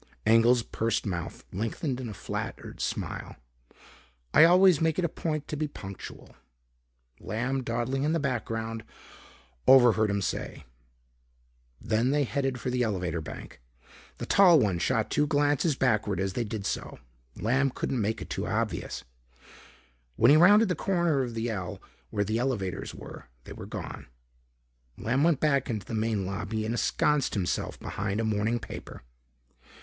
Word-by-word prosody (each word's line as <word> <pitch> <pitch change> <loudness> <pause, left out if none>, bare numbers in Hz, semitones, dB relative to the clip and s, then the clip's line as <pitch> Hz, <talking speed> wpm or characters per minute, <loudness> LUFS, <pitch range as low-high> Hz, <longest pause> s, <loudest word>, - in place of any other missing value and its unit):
Engel's 115 +2 +5
pursed 115 -1 -1
mouth 85 -4 -4
lengthened 125 - -2
in 120 - -5
a - - -6
flattered - - -6
smile. - - -4 1.0
"I 160 - +8
always 180 -2 +6
make 160 -1 +1
it 180 - +1
a - - +3
point 155 -2 -3
to - - -2
be 150 +1 -1
punctual," 100 -9 -10 0.8
Lamb 125 +6 -2
dawdling 125 +2 -2
in 150 +2 +1
the 165 - +1
background, 115 -4 -3 0.8
overheard 120 -5 +6
him 100 0 0
say. - - -4 1.1
Then 115 +3 +1
they 145 +1 +2
headed 135 -1 -1
for 125 - -3
the 125 0 0
elevator 90 -7 -1
bank. 70 - -9 0.6
The - - -5
tall 185 -4 +6
one 100 -8 +1
shot - - 0
two 150 - +2
glances 145 0 +2
backward 110 -6 +1
as 95 0 -1
they 120 +4 -1
did 105 -2 -5
so - - -3 0.4
Lamb 135 +5 +1
couldn't 125 -1 -2
make 110 +2 -1
it - - -13
too - - -2
obvious. - - -2 1.1
When 115 - +5
he - - +8
rounded 205 +6 +7
the 180 - +1
corner 170 -5 +1
of 120 -3 -4
the 115 +1 -1
ell 95 -4 -5 0.3
where 105 -1 0
the 110 +3 -1
elevators 115 -8 -2
were, - - -10 0.2
they - - -9
were - - -9
gone. - - -7 0.9
Lamb 130 +5 0
went 165 -4 +3
back 140 -3 +1
into 105 -5 -3
the - - -7
main 110 -3 0
lobby 100 +3 -3
and 110 - -1
ensconced 140 +4 +1
himself 95 -4 -2
behind 105 +1 -3
a - - 0
morning 110 +2 0
paper. 115 - -9
120 Hz, 155 wpm, -28 LUFS, 110-145 Hz, 1.1 s, I